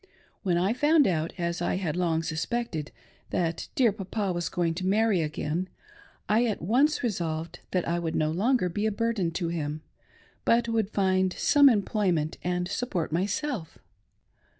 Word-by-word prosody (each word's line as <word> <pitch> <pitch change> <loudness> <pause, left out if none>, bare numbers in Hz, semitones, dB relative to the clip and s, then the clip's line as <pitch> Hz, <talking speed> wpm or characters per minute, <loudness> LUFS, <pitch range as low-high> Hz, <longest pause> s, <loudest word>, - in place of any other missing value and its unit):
When 180 -4 +1
I 190 +5 +2
found 295 +3 +4
out, 165 -4 0
as 170 -1 -2
I 175 - 0
had 180 -5 -2
long 165 -2 +1
suspected, 165 0 -3 0.4
that 165 -2 -1
dear 245 -5 +4
Papa 200 -1 -3
was 175 -1 -2
going 170 -2 0
to 185 +2 -3
marry 210 -2 +3
again, 155 +3 -2 0.6
I 225 +3 +3
at 215 - -2
once 275 - +2
resolved 170 -6 -2
that 180 -2 -1
I 170 +1 0
would 165 -1 -3
no 155 0 +1
longer 215 +4 +2
be 205 +5 -1
a - - +1
burden 215 -4 0
to 170 -1 -2
him, 155 -2 -3 0.6
but 235 0 +3
would 225 -3 0
find 190 -2 +2
some 285 -1 +5
employment 195 -8 0
and 180 0 -1
support 190 -6 -2
myself. 200 - -2
185 Hz, 160 wpm, -27 LUFS, 165-225 Hz, 0.6 s, some